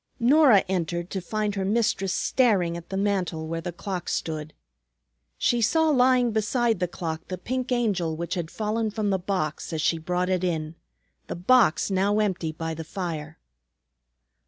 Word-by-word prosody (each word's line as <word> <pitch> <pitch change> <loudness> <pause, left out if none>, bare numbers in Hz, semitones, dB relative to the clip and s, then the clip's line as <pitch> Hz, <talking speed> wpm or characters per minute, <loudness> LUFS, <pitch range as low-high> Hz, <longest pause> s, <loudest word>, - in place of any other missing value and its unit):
Norah 255 -4 +5
entered 175 -1 -2
to 190 - -3
find 210 +3 -2
her 195 -1 -2
mistress 205 -2 +1
staring 195 -8 +2
at 170 0 -9
the 195 - -3
mantel 185 -5 -1
where 165 +1 -3
the 175 - -4
clock 180 +1 -5
stood. 155 -1 -3 0.8
She 240 -1 +1
saw 320 +8 +3
lying 255 -3 +4
beside 225 +2 +1
the 180 - 0
clock 165 -2 -5
the 185 - -4
pink 255 +7 -3
Angel 200 -10 0
which 170 +2 -4
had 175 -4 -3
fallen 220 +2 -1
from 210 -1 -1
the 190 - +1
box 180 -6 -3
as 160 -1 -2
she 165 - +2
brought 180 +2 -1
it 185 -1 0
in, 160 -3 -1 0.5
the - - -4
box 200 0 +3
now 195 +2 +2
empty 190 -6 0
by 160 +1 -4
the 160 +1 -6
fire. 160 -3 -5
190 Hz, 170 wpm, -25 LUFS, 170-220 Hz, 0.8 s, Norah